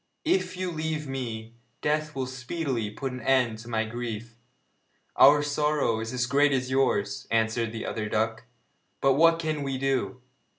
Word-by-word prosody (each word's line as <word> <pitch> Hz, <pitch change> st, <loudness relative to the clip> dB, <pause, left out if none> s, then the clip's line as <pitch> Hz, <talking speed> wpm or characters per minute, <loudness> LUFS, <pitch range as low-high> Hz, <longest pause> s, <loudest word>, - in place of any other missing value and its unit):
If 345 Hz, -, +1 dB
you 185 Hz, -1 st, -2 dB
leave 155 Hz, -2 st, -3 dB
me, 115 Hz, -4 st, -5 dB, 0.3 s
death 150 Hz, 0 st, 0 dB
will 135 Hz, -1 st, -1 dB
speedily 130 Hz, -3 st, -3 dB
put 130 Hz, +5 st, -4 dB
an 125 Hz, 0 st, -7 dB
end 120 Hz, -3 st, +2 dB
to 115 Hz, -, -11 dB
my 110 Hz, -1 st, 0 dB
grief.' 115 Hz, 0 st, -5 dB, 0.8 s
'Our 145 Hz, +2 st, +7 dB
sorrow 145 Hz, -5 st, +1 dB
is 110 Hz, 0 st, -4 dB
as 125 Hz, -1 st, 0 dB
great 140 Hz, +3 st, +3 dB
as 130 Hz, -1 st, -1 dB
yours,' 100 Hz, -7 st, +1 dB
answered 115 Hz, 0 st, +1 dB
the 110 Hz, -1 st, -5 dB
other 105 Hz, -1 st, -3 dB
duck, 110 Hz, +2 st, -1 dB, 0.5 s
'but 135 Hz, 0 st, +4 dB
what 165 Hz, +4 st, +5 dB
can 155 Hz, -2 st, -2 dB
we 135 Hz, -1 st, -2 dB
do? 130 Hz, -1 st, -1 dB
130 Hz, 165 wpm, -27 LUFS, 115-145 Hz, 0.8 s, Our